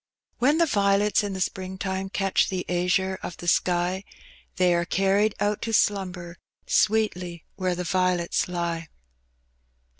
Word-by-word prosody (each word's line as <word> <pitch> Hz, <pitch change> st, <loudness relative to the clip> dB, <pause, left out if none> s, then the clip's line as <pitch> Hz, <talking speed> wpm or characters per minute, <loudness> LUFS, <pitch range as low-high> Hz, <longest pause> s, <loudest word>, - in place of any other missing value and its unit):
When 285 Hz, +6 st, +3 dB
the 335 Hz, -, +4 dB
violets 205 Hz, -5 st, +2 dB
in 205 Hz, -1 st, -3 dB
the 190 Hz, -, -5 dB
spring 190 Hz, 0 st, -3 dB
time 190 Hz, 0 st, -3 dB
Catch 195 Hz, -1 st, +1 dB
the 185 Hz, -2 st, -3 dB
aznre 185 Hz, +2 st, 0 dB
of 175 Hz, -, -6 dB
the 175 Hz, -, -8 dB
sky. 180 Hz, +2 st, +1 dB, 0.5 s
They 180 Hz, -1 st, +3 dB
are 170 Hz, 0 st, +1 dB
carried 195 Hz, +4 st, +1 dB
out 205 Hz, 0 st, 0 dB
to 225 Hz, -, -3 dB
slumber 180 Hz, -5 st, 0 dB, 0.3 s
Sweetly 180 Hz, -6 st, +1 dB
where 185 Hz, -2 st, -1 dB
the 180 Hz, -, -3 dB
violets 180 Hz, -1 st, +1 dB
lie. 170 Hz, -2 st, -3 dB
190 Hz, 145 wpm, -25 LUFS, 175-200 Hz, 0.5 s, the